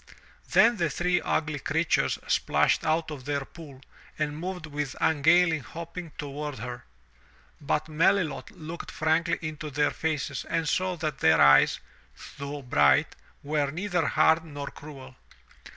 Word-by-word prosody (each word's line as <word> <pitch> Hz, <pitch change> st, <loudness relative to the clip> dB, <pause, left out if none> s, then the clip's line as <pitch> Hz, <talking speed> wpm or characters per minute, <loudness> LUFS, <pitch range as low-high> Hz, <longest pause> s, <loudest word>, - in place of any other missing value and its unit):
Then 235 Hz, 0 st, +5 dB
the 170 Hz, -4 st, 0 dB
three 180 Hz, +3 st, 0 dB
ugly 155 Hz, -2 st, -1 dB
creatures 160 Hz, +4 st, 0 dB
splashed -, -, +2 dB
out 160 Hz, 0 st, 0 dB
of 135 Hz, -4 st, -8 dB
their 140 Hz, -1 st, -2 dB
pool 145 Hz, -6 st, -13 dB, 0.4 s
and 150 Hz, -1 st, -2 dB
moved 180 Hz, +2 st, -5 dB
with 145 Hz, -3 st, -4 dB
ungainly 160 Hz, +2 st, +4 dB
hopping 170 Hz, +4 st, -8 dB
toward 145 Hz, -1 st, -5 dB
her. 125 Hz, +3 st, -7 dB, 0.8 s
But 150 Hz, +2 st, -1 dB
Melilot 160 Hz, -3 st, +1 dB
looked 165 Hz, +2 st, -8 dB
frankly 160 Hz, +2 st, +1 dB
into 155 Hz, -1 st, -5 dB
their 145 Hz, +1 st, +1 dB
faces 150 Hz, -4 st, -3 dB
and 165 Hz, -1 st, -1 dB
saw 185 Hz, +3 st, 0 dB
that 155 Hz, -4 st, -4 dB
their 80 Hz, 0 st, +4 dB
eyes, 70 Hz, 0 st, +6 dB, 0.6 s
though 140 Hz, 0 st, -6 dB
bright, 75 Hz, -, +3 dB, 0.3 s
were 145 Hz, -1 st, 0 dB
neither 180 Hz, +2 st, -1 dB
hard 160 Hz, +1 st, +3 dB
nor 145 Hz, -3 st, -7 dB
cruel. 135 Hz, -3 st, -12 dB
155 Hz, 135 wpm, -27 LUFS, 140-165 Hz, 0.8 s, eyes